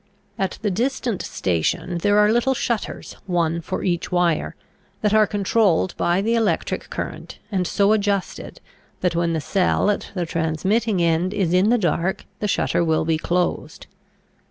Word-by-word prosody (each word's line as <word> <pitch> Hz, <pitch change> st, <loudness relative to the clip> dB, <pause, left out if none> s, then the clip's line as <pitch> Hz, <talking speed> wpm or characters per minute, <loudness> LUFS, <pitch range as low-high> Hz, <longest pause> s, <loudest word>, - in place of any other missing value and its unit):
At 190 Hz, -1 st, -1 dB
the 205 Hz, -, +1 dB
distant 235 Hz, 0 st, -1 dB
station 95 Hz, -, -1 dB
there 205 Hz, +3 st, +2 dB
are 210 Hz, 0 st, +5 dB
little 240 Hz, +3 st, +2 dB
shutters, 235 Hz, -2 st, -3 dB
one 170 Hz, -2 st, 0 dB
for 185 Hz, +3 st, -4 dB
each 175 Hz, -2 st, -1 dB
wire, 175 Hz, -3 st, +1 dB, 0.5 s
that 210 Hz, -1 st, +1 dB
are 215 Hz, -1 st, +5 dB
controlled 200 Hz, -3 st, +1 dB
by 175 Hz, +2 st, +1 dB
the 225 Hz, +2 st, +1 dB
electric 225 Hz, -3 st, 0 dB
current -, -, -6 dB
and 185 Hz, -3 st, 0 dB
so 200 Hz, +3 st, +2 dB
adjusted 200 Hz, -2 st, -2 dB, 0.4 s
that 180 Hz, -2 st, +1 dB
when 170 Hz, 0 st, +1 dB
the 160 Hz, -, 0 dB
cell 195 Hz, +4 st, +1 dB
at 205 Hz, -, -4 dB
the 180 Hz, -2 st, -1 dB
transmitting 175 Hz, +6 st, 0 dB
end 170 Hz, +4 st, +1 dB
is 185 Hz, -4 st, 0 dB
in 185 Hz, +4 st, +4 dB
the 245 Hz, -, +4 dB
dark 175 Hz, -1 st, -1 dB
the 210 Hz, -, -1 dB
shutter 180 Hz, -, +1 dB
will 160 Hz, -1 st, +1 dB
be 160 Hz, -1 st, +1 dB
closed. 175 Hz, +2 st, -2 dB
185 Hz, 160 wpm, -22 LUFS, 170-210 Hz, 0.5 s, are